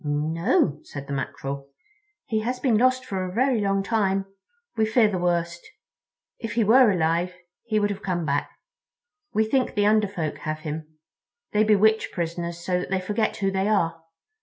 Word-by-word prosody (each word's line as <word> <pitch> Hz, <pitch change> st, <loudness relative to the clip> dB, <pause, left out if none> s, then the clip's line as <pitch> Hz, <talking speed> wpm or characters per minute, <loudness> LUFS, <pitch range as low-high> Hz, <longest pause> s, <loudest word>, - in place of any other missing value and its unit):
"No," 155 Hz, -, +1 dB
said 140 Hz, -1 st, -8 dB
the 140 Hz, -, -5 dB
Mackerel; 140 Hz, +1 st, -4 dB, 0.6 s
"he 220 Hz, -, 0 dB
has 250 Hz, +3 st, -2 dB
been 250 Hz, -5 st, +2 dB
lost 255 Hz, +3 st, +3 dB
for 195 Hz, -6 st, -3 dB
a 185 Hz, -, -4 dB
very 245 Hz, +2 st, +2 dB
long 195 Hz, -1 st, +1 dB
time. 195 Hz, -2 st, +1 dB, 0.5 s
We 220 Hz, -, +2 dB
fear 220 Hz, +1 st, +4 dB
the 190 Hz, -3 st, -2 dB
worst. 175 Hz, -1 st, -1 dB, 0.8 s
If 225 Hz, -2 st, -5 dB
he 230 Hz, 0 st, +2 dB
were 235 Hz, +3 st, +6 dB
alive 175 Hz, 0 st, +1 dB, 0.3 s
he 215 Hz, -2 st, +1 dB
would 205 Hz, 0 st, +1 dB
have 200 Hz, 0 st, -6 dB
come 175 Hz, -3 st, -2 dB
back. 145 Hz, -1 st, 0 dB, 0.8 s
We 220 Hz, +1 st, +2 dB
think 260 Hz, +3 st, 0 dB
the 205 Hz, -1 st, +2 dB
Under 215 Hz, 0 st, +4 dB
Folk 165 Hz, -6 st, -4 dB
have 155 Hz, -1 st, -4 dB
him. 155 Hz, 0 st, -6 dB, 0.5 s
They 210 Hz, 0 st, +3 dB
bewitch 220 Hz, +1 st, +3 dB
prisoners 170 Hz, 0 st, -3 dB
so 180 Hz, 0 st, +1 dB
that 180 Hz, -, -5 dB
they 190 Hz, 0 st, +1 dB
forget 210 Hz, +4 st, -1 dB
who 195 Hz, -1 st, 0 dB
they 190 Hz, +1 st, 0 dB
are. 165 Hz, -6 st, +1 dB
195 Hz, 180 wpm, -25 LUFS, 165-220 Hz, 0.8 s, were